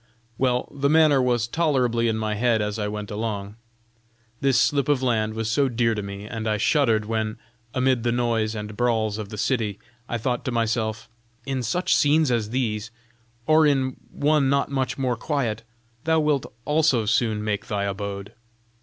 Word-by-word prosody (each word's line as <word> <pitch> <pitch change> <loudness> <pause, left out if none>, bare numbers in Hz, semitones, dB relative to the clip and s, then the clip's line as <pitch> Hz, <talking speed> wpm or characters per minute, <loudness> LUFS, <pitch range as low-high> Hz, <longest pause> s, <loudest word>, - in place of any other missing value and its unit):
Well, 125 -1 +1
the 140 0 +1
matter 155 -3 +5
was 120 -2 +1
tolerably 125 -6 +1
in 110 -1 0
my 110 -1 -1
head 115 +1 +2
as 105 +1 -2
I 105 - -1
went 105 0 -5
along. 105 -1 -4 0.8
This 135 -4 +3
slip 140 +1 +2
of 135 -3 +2
land 110 -3 0
was 110 -1 -2
so 140 +2 +2
dear 115 -1 +1
to 105 - -3
me, 100 0 -7
and 110 +1 -5
I 110 -1 +1
shuddered 115 -3 +2
when, 110 0 -2 0.4
amid 130 -1 +2
the 120 +1 0
noise 115 -2 0
and 105 0 -6
brawls 110 -3 0
of 105 -2 -6
the 105 - -7
city, 110 -7 0 0.3
I 120 - -1
thought 120 +1 -2
to 130 - -1
myself, 110 -2 -1 0.4
'In 135 -1 -2
such 175 +10 0
scenes 150 -1 +3
as 115 -3 0
these, 110 -3 -2 0.6
or 155 0 +5
in 130 -3 +1 0.2
one 145 -2 +2
not 140 0 +1
much 130 -2 -1
more 130 -3 0
quiet, 115 -4 -2 0.4
thou 160 0 +3
wilt 150 -3 0
also 150 -7 +2
soon 110 -1 +1
make 105 -1 -2
thy 100 -1 -1
abode!' 100 0 -4
115 Hz, 180 wpm, -24 LUFS, 110-135 Hz, 0.8 s, matter